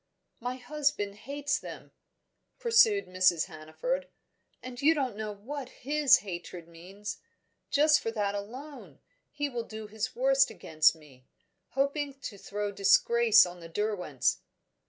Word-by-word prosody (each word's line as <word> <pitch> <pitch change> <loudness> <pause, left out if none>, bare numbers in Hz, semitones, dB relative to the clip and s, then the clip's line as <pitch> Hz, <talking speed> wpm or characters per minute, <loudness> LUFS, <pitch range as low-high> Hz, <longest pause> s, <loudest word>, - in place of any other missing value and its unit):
"My 245 +2 -3
husband 255 -6 -1
hates 280 +6 -3
them," - - -10 0.7
pursued 220 - +4
Mrs. 185 -2 +2
Hannaford, 190 - -4 0.6
"and 250 -1 -8
you 315 +3 +5
don't 265 -7 -1
know 215 0 -4
what 255 +6 -7
his 295 +1 +4
hatred 175 -2 -7
means. 185 +5 -8 0.5
Just 300 +1 +4
for - - -2
that 205 -3 -1
alone, 255 +9 -8 0.3
he 290 0 -2
will 245 -4 -3
do 220 -1 -8
his 215 +1 -4
worst 270 +2 +4
against 155 0 +2
me 135 -5 -19 0.5
hoping 280 +1 -1
to 200 -7 -7
throw 205 +1 -4
disgrace 220 +3 +5
on 175 0 -9
the 165 -1 -11
Derwents." 180 - -1
220 Hz, 135 wpm, -29 LUFS, 190-275 Hz, 0.7 s, you